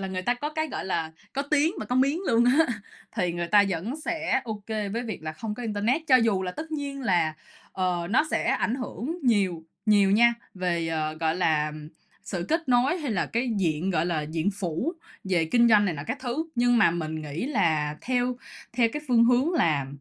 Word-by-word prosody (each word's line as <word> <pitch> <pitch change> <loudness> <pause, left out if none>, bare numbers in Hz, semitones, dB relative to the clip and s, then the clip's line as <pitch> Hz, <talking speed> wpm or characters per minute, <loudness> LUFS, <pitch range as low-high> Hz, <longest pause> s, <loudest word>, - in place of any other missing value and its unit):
là, 195 - -3
người 185 -1 -3
ta 245 +6 +1
có 290 +5 -4
cái, 315 0 -1
gọi - - -5
là, 165 -4 -2 0.2
có 275 - -1
tiếng 300 +4 +1
và - - -5
có 250 - -2
miếng 275 +6 +2
luôn 230 +1 +4
á, 280 +7 +4 0.5
thì 180 -5 0
người 175 0 -3
ta 205 +2 +6
vẫn 200 - -3
sẽ 320 -2 0
ô 215 -3 -5
kê 215 -2 -2
với 230 +4 -3
việc 220 -8 -6
là 155 0 -4
không 210 +7 -5
có 245 - -7
internet. 225 +6 0
Cho 260 - +7
dù 225 -6 +2
là 180 - -3
tất 315 - -7
nhiên 285 -2 -4
là, 175 -8 +1 0.4
ờ, 180 -2 -1
nó 260 +8 +4
sẽ - - 0
ảnh 230 - 0
hưởng 265 +5 -5
nhiều 195 -9 +1 0.2
nhiều 205 -2 +5
nha 235 +4 +5 0.2
về, 175 -3 -1
ờ, 155 -1 -2
gọi 160 0 +1
là, 155 -4 +1 0.5
sự 175 -3 -4
kết 325 -2 0
nối 250 +6 +3
hay 295 -6 -3
là 195 -5 0
cái 240 +2 -1
diện, 170 0 0
gọi 170 -2 +1
là, 165 -3 -1
diện 160 +5 -1
phủ 195 - -3 0.3
về 180 -4 +1
kinh 235 +8 +4
doanh 210 -2 +6
này 180 -4 0
nọ 140 - -5
các 275 - -3
thứ, 270 +6 -3
nhưng 245 0 +3
mà 215 - +5
mình 160 -2 -3
nghĩ 150 +6 -4
là 160 - +1
theo 250 0 0 0.4
theo 235 -1 +3
cái 300 - -4
phương 235 -2 +5
hướng 250 +7 +3
là 155 - +2
210 Hz, 220 wpm, -26 LUFS, 170-255 Hz, 0.5 s, Cho